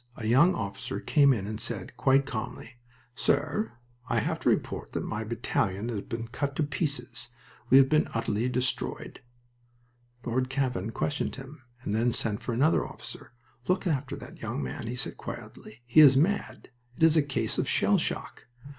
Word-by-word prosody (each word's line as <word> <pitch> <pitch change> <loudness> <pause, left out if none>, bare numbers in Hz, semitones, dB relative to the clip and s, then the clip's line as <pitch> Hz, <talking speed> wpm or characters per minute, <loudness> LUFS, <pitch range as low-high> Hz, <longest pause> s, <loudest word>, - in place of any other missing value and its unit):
A 110 - -6
young 140 +11 +5
officer 115 +2 -4
came 140 -3 +4
in 105 -7 0
and 110 +1 -5
said, 115 -5 -3
quite 135 0 +3
calmly: 120 0 -6 0.4
"Sir, 145 - 0 0.4
I 120 - +1
have 110 - 0
to - - +2
report - - -1
that - - -2
my 105 +1 -3
battalion 110 -2 -1
has 110 -4 -2
been 115 +2 -5
cut 140 +3 -3
to 155 - +1
pieces. 130 -5 -2 0.4
We 130 - +8
have 135 -1 +7
been 155 +3 +3
utterly 115 +1 0
destroyed." 125 +1 -2 1.0
Lord 130 +2 0
Cavan 130 -7 -1
questioned 145 +6 -2
him, 135 +1 -10 0.2
and 105 - -2
then 115 +2 +2
sent 110 0 0
for 120 - -3
another 140 +8 +3
officer. - - -9 0.3
"Look 185 +2 +1
after 145 -6 -1
that - - -11
young - - -3
man," 65 - -5
he 120 - -3
said, 125 - -4
quietly. 110 +3 -9
"He 120 +6 +4
is 140 -3 +9
mad. 180 -2 0 0.3
It - - -1
is 160 -1 +6
a 155 - +6
case 140 -1 -2
of - - 0
shell - - +3
shock." - - -4
125 Hz, 175 wpm, -28 LUFS, 115-140 Hz, 1.0 s, is